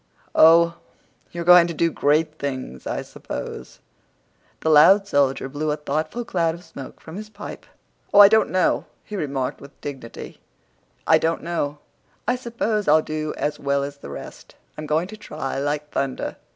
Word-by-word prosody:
"Oh, 170 +1 +6 0.5
you're 170 0 -4
going 175 0 +7
to 170 - -5
do 165 +1 +1
great 155 +2 +1
things, 130 - -5
I - - -3
s'pose!" 65 - -8 0.8
The 160 - 0
loud 195 +7 +7
soldier 140 -5 +1
blew 145 +3 -3
a 150 - 0
thoughtful 155 +11 -3
cloud 165 -6 0
of 170 - -13
smoke 150 -6 -10
from 160 +3 -10
his 215 0 -8
pipe. 205 -1 -9 0.4
"Oh, 205 - +5
I 205 - +12
don't 220 +2 +3
know," 185 -1 +1 0.2
he 210 - -8
remarked 140 -7 -3
with 140 0 -14
dignity; 135 -5 -8 0.6
"I - - +5
don't 165 +1 -1
know. 155 -4 -2 0.5
I 245 - +2
s'pose 230 -4 -2
I'll 155 +1 +5
do 155 0 -4
as 150 - -2
well 140 0 0
as 140 0 -6
the 140 - -10
rest. 70 - -10 0.2
I'm 155 0 -7
going 155 +3 +1
to 215 +2 -10
try 150 -9 -5
like 145 +1 -2
thunder." 135 -1 -3
155 Hz, 170 wpm, -23 LUFS, 145-175 Hz, 0.8 s, I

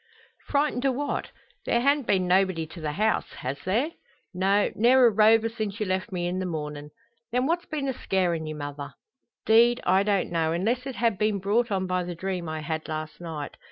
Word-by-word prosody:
"Frightened 285 -3 0
o' 270 - +3
what? 285 +3 -3 0.4
There 235 - +3
han't 280 +1 +2
been 185 -2 +2
nobody 185 -3 +2
to 160 +2 -11
the 150 -1 -2
house 215 +6 0
has 135 +2 -5
there?" 235 - +1 0.4
"No; 195 +3 +2
ne'er 250 +3 +5
a 235 - +6
rover 220 +2 +5
since 215 -2 -4
you 215 - 0
left 185 0 -2
me 175 -2 -2
in 180 +1 -2
the 185 - -2
mornin'." 150 -3 -5 0.4
"Then 250 +2 +1
what's 345 +4 -1
been 290 -3 -3
a 265 - 0
scarin' 175 -7 -1
ye, 155 - -5
mother?" 145 -2 -7 0.5
"'Deed, 235 +2 +5
I 190 +1 +4
don't 200 -3 0
know, 165 -1 +1
unless 235 +9 -1
it 265 - -5
ha' 230 -3 +1
been 210 +1 +1
brought 210 +5 +1
on 190 -2 0
by 185 0 -1
the 175 0 -5
dream 180 -1 -3
I 155 0 -4
had 160 0 -4
last 155 +1 -5
night. 160 -4 -6
190 Hz, 205 wpm, -26 LUFS, 165-235 Hz, 0.5 s, a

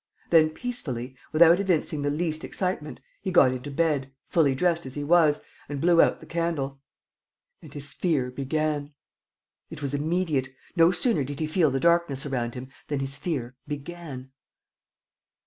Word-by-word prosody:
Then, 160 -2 +6
peacefully, 140 - -5 0.2
without 170 +3 +6
evincing 170 -6 0
the 145 - 0
least 155 +1 -2
excitement, 180 -5 -3 0.2
he 195 - -3
got 175 -7 +6
into 130 +2 -5
bed, 145 -3 0
fully 145 -6 +2
dressed 170 0 +1
as 130 - -9
he 145 - -3
was, 155 -1 +4 0.3
and 145 -1 -3
blew 170 +2 +5
out - - +2
the - - -12
candle. 155 -5 -2 0.8
And - - -13
his 145 -1 -7
fear 140 -8 0
began. 145 +2 -2 0.7
It 150 - -8
was 140 0 -2
immediate. 150 -3 0 0.3
No 165 -1 +6
sooner 180 - +2
did 140 +1 -6
he 155 - 0
feel 155 0 +2
the 135 0 -1
darkness 170 -3 +2
around 120 -4 -2
him 130 +1 -7 0.2
than 145 -2 -1
his 135 0 -4
fear 130 -7 -3
began! 145 -3 -7
150 Hz, 160 wpm, -26 LUFS, 135-170 Hz, 0.8 s, Then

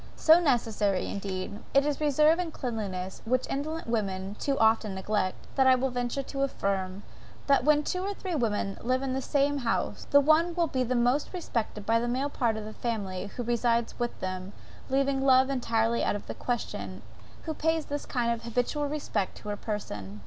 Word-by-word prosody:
So 320 +2 +6
necessary 225 - +1
indeed, 195 0 -4 0.2
is 280 +1 +3
that - - -4
reserve 300 +3 +4
and 350 -3 -2
cleanliness 200 -9 -4
which 255 +2 +1
indolent 310 +4 -3
women 200 -3 -2
too 275 -1 0
often 220 -2 +3
neglect, 190 0 -1
that 265 -1 +4
I 260 - +7
will 260 +1 0
venture 245 +2 -2
to 275 +1 -5
affirm, 195 -7 -1 0.4
that 275 -3 +4
when 300 +1 +4
two 365 +4 -2
or 400 +2 -2
three 375 -2 -4
women 215 -8 -1
live 255 +3 0
in 265 -1 -1
the 265 - -1
same 285 +1 +1
house, 235 -3 -2
the 285 - +7
one 315 +4 +3
will 345 -1 +3
be 260 -5 0
most 245 +3 +1
respected 230 - -3
by 230 0 +3
the 240 - -1
male 265 +4 -1
part 230 -6 0
of 215 - -5
the 215 - -7
family, 205 -6 -3
who 240 +4 -5
reside 235 0 +1
with 240 0 -2
them, 185 +1 -4 0.4
leaving 270 0 +1
love 260 0 +5
entirely 230 -3 +1
out - - +1
of 205 - -6
the - - -5
question, 245 -2 -4 0.4
who 320 - -3
pays 320 0 0
this 290 0 -4
kind 240 -3 0
of 230 -1 -2
habitual 245 +5 -1
respect 280 -9 -2
to 210 - -8
her 205 - -1
person. 105 - -5
245 Hz, 190 wpm, -28 LUFS, 210-280 Hz, 0.4 s, I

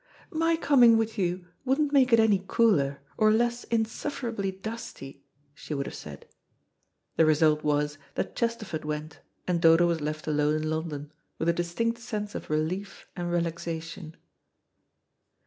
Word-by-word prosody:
"My 330 +1 +2
coming 250 -8 +6
with 225 -1 -1
you 180 -1 -1 0.2
wouldn't 280 +3 +1
make 260 -3 +5
it 230 - +6
any 210 -4 +3
cooler, 140 -13 +2 0.2
or 215 -1 +5
less 240 +2 +1
insufferably 225 -2 -2
dusty," 195 -8 -8 0.3
she 150 - -6
would 140 -1 -2
have - - -6
said. 75 -2 -9 0.9
The 160 - +6
result 155 0 +3
was 150 -1 0 0.2
that - - -3
Chesterford 230 -9 -2
went, 150 0 -5 0.3
and 175 -2 +1
Dodo 165 0 +6
was 170 -2 0
left 155 +1 -4
alone' 150 0 +1
in 155 0 -1
London, 155 -2 -4 0.3
with 165 - 0
a - - +4
distinct 200 +8 -1
sense 210 -3 -4
of - - -7
relief 170 +6 -2
and 175 -1 -3
relaxation. 165 -1 -3
175 Hz, 145 wpm, -27 LUFS, 155-230 Hz, 0.9 s, coming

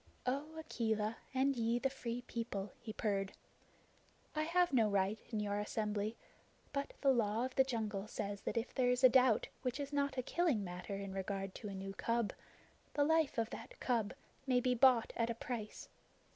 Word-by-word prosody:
"O 285 +5 -2
Akela, 220 -7 -1
and 270 +1 +2
ye 230 0 +1
the 255 - +1
Free 245 -2 -4
People," 220 -5 -4
he 235 -2 -6
purred, 200 -3 -1 1.0
"I 305 - +1
have 345 +1 +2
no 225 -4 +5
right 200 +1 +1
in 220 -3 -1
your 205 0 0
assembly, 210 +1 -1 0.6
but 280 0 -2
the 275 - +5
Law 230 -1 +2
of 260 - -5
the 265 - +5
Jungle 215 -5 -2
says 200 -1 -4
that - - -3
if 230 +2 -1
there 250 -1 +3
is 250 +1 +1
a 255 - +10
doubt 250 -3 +4
which 250 +2 -2
is 285 0 -4
not 280 -1 +1
a 255 - 0
killing 310 - +1
matter 180 +2 -5
in 195 -1 -5
regard 195 0 -3
to 215 - -7
a 195 - -5
new 195 +1 -5
cub, 230 +1 0 0.6
the 290 - +4
life 320 -2 +3
of 225 -1 0
that 230 - -8
cub 230 -5 0 0.3
may 250 -1 +4
be 250 0 +2
bought 250 -1 +5
at 230 0 +1
a 235 - -1
price. 230 -2 -5
230 Hz, 190 wpm, -37 LUFS, 210-260 Hz, 1.0 s, a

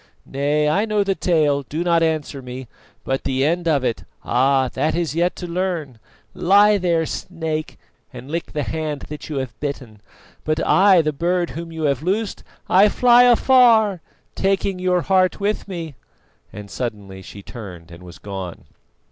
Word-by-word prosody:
Nay, 145 +2 0
I 195 +8 +2
know 210 -2 +1
the 195 -1 0
tale, 155 -6 +1
do 150 +5 -4
not 170 -1 +2
answer 155 -4 -1
me, 125 0 -8 0.4
but 135 0 -2
the 135 +1 0
end 170 +2 0
of 145 -5 +2
it 115 - -2 0.2
ah! 130 +2 +2
that 155 +6 -1
is 170 -3 -1
yet 175 +2 0
to 180 - -7
learn. 170 -8 -3 0.3
Lie 205 +3 +4
there, 170 -3 +1
snake, 160 -2 -5 0.3
and 130 - -10
lick 170 +1 -4
the 150 -2 -1
hand 155 -2 -4
that 150 0 -8
you 150 - -4
have 125 -5 -5
bitten, 130 -7 -6 0.4
but 155 +1 -1
I, 190 -3 +5
the 155 0 -1
bird 175 +3 -1
whom 165 0 -7
you 160 -1 -5
have 140 -3 +1
loosed, 200 +6 -2 0.2
I 200 +3 +5
fly 245 +2 +5
afar 235 -6 +4 0.3
taking 195 -1 0
your 180 -1 +1
heart 185 0 +2
with 205 +1 -2
me!" 170 -5 -6 0.6
and 100 0 -10
suddenly 100 -6 -6
she 100 +2 -11
turned 90 -8 -10
and 85 +1 -12
was 90 -2 -12
gone. 95 -3 -7
160 Hz, 170 wpm, -21 LUFS, 135-185 Hz, 0.6 s, I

